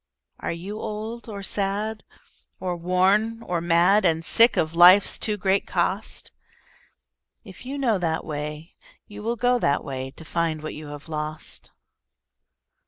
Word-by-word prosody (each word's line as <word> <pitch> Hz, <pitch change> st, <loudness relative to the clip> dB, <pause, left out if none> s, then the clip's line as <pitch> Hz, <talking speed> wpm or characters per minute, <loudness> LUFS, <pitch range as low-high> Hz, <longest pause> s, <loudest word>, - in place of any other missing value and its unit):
Are -, -, -3 dB
you 190 Hz, +6 st, -6 dB
old 220 Hz, +3 st, -6 dB
or 200 Hz, -2 st, -6 dB
sad 205 Hz, +3 st, -2 dB, 0.6 s
or 180 Hz, -1 st, -2 dB
worn 195 Hz, +6 st, +1 dB
or 175 Hz, -2 st, -2 dB
mad, 175 Hz, +5 st, +4 dB
And 165 Hz, -2 st, +1 dB
sick 230 Hz, +5 st, +4 dB
of 155 Hz, 0 st, +1 dB
life's 180 Hz, +4 st, +6 dB
too 210 Hz, -1 st, 0 dB
great 195 Hz, 0 st, +1 dB
cost? -, -, -2 dB, 1.1 s
If 210 Hz, +3 st, -12 dB
you 280 Hz, +2 st, -4 dB
know 235 Hz, -8 st, +1 dB
that 160 Hz, -2 st, -1 dB
way, 150 Hz, +2 st, -6 dB, 0.3 s
you 205 Hz, 0 st, -10 dB
will 230 Hz, +2 st, -1 dB
go 245 Hz, +2 st, +2 dB
that 140 Hz, -8 st, +1 dB
way, 130 Hz, -1 st, -5 dB
To 160 Hz, +4 st, -14 dB
find 160 Hz, -1 st, -1 dB
what 155 Hz, -, -5 dB
you 150 Hz, 0 st, -9 dB
have 145 Hz, +1 st, -9 dB
lost. 155 Hz, 0 st, -6 dB
185 Hz, 150 wpm, -24 LUFS, 160-215 Hz, 1.1 s, life's